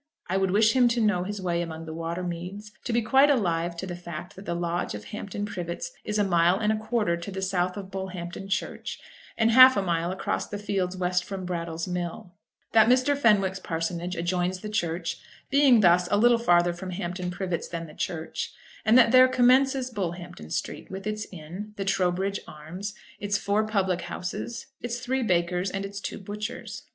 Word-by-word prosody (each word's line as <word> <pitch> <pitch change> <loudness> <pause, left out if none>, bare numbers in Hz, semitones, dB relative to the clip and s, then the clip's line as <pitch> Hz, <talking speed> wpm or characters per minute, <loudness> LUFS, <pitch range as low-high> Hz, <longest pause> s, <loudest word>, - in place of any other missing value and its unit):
I 190 - 0
would 190 0 +2
wish 215 +4 +4
him 250 -2 +6
to 240 0 +1
know 205 -5 +2
his 205 +1 -4
way 175 -2 0
among 165 -1 -5
the 160 - -6
water 165 +2 -3
meads, 180 +4 -6
to - - -1
be 235 0 +2
quite 270 +6 +5
alive 175 -9 +1
to 190 - -4
the 180 -2 -5
fact 175 0 -8
that 190 - -11
the 170 - -1
lodge 175 -6 -2
of 105 - -7
Hampton 205 - -5
Privets 170 -3 -5
is 210 - -2
a 205 - +3
mile 175 -1 +3
and 215 +1 +1
a - - +1
quarter 215 -4 0
to 170 +3 -7
the 190 -1 -3
north 180 +1 0
of 195 -1 -7
Bullhampton 190 0 -6
church, 195 - -3 0.4
and 225 0 +3
half 255 0 +9
a - - +3
mile 170 -1 0
across 190 +1 -2
the 205 - -5
fields 195 -3 -2
west 180 0 +1
from 190 -1 -6
Brattle's 170 -2 -3
mill; 180 0 -4 0.4
that 220 -1 +6
Mr. 255 +3 +4
Fenwick's 200 -7 +3
parsonage 170 +1 -3
adjoins 180 +2 -1
the 210 - -5
churchyard, 170 -4 -2 0.3
being 275 -5 +6
thus 175 -1 +5
a 205 - +3
little 235 +2 +5
farther 175 -5 +4
from 185 +2 -7
Hampton 180 0 -3
Privets 180 -1 -3
than 170 -1 -5
the 155 - -12
church; 160 -1 -4 0.3
and 220 +3 +5
that 235 -2 +6
there 255 0 +8
commences 255 +1 +3
Bullhampton 175 - -5
street, - - -4
with 190 +1 -7
its 215 0 -3
inn, 185 +5 -8
the 195 - -3
Trowbridge 190 +1 +1
Arms, 175 +7 -7 0.2
its 200 -1 0
four 210 +2 +1
public 190 -4 +1
houses, 180 +6 -5 0.2
its 240 0 -3
three 260 +1 -1
bakers, 180 -2 +1
and 195 +1 -3
its 200 0 -6
two - - -4
butchers. 210 +3 -6
190 Hz, 200 wpm, -27 LUFS, 175-215 Hz, 0.4 s, half